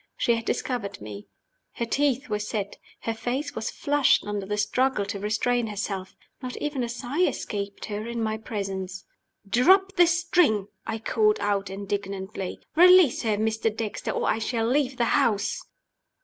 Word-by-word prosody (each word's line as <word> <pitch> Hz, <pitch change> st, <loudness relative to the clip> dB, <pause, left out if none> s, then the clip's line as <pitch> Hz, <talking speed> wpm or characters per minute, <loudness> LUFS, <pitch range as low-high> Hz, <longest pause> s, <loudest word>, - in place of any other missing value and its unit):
She 235 Hz, -, +3 dB
had 230 Hz, 0 st, -2 dB
discovered 220 Hz, -6 st, -2 dB
me. 105 Hz, -1 st, -9 dB, 0.5 s
Her 235 Hz, -, -2 dB
teeth 275 Hz, +2 st, +1 dB
were 210 Hz, -, -1 dB
set; 210 Hz, -1 st, -3 dB, 0.2 s
her 225 Hz, -, -2 dB
face 260 Hz, +6 st, -3 dB
was 220 Hz, -, -3 dB
flushed 290 Hz, -2 st, +2 dB
under 205 Hz, -2 st, -3 dB
the 210 Hz, +1 st, -2 dB
struggle 210 Hz, +1 st, +1 dB
to 200 Hz, 0 st, -4 dB
restrain 225 Hz, +3 st, 0 dB
herself. 195 Hz, -2 st, -4 dB, 0.3 s
Not 250 Hz, -1 st, -5 dB
even 290 Hz, -4 st, -2 dB
a 235 Hz, -, -3 dB
sigh 245 Hz, +7 st, -3 dB
escaped 200 Hz, -, -2 dB
her 210 Hz, +1 st, -4 dB
in 235 Hz, 0 st, -4 dB
my 220 Hz, 0 st, -1 dB
presence. 195 Hz, -3 st, -5 dB, 0.4 s
"Drop 380 Hz, -, +4 dB
the 350 Hz, -1 st, +7 dB
string!" 330 Hz, -, +2 dB, 0.2 s
I 225 Hz, -, -2 dB
called 215 Hz, -1 st, +2 dB
out, 200 Hz, -1 st, 0 dB
indignantly 195 Hz, 0 st, -4 dB, 0.2 s
"Release 360 Hz, -4 st, +7 dB
her, 215 Hz, -2 st, 0 dB
Mr. 220 Hz, +1 st, +1 dB
Dexter, 215 Hz, -3 st, -3 dB
or -, -, -1 dB
I 225 Hz, -, +1 dB
shall 225 Hz, 0 st, -1 dB
leave 265 Hz, 0 st, +1 dB
the 235 Hz, -, +2 dB
house." 230 Hz, -7 st, +1 dB
220 Hz, 165 wpm, -26 LUFS, 205-255 Hz, 0.5 s, the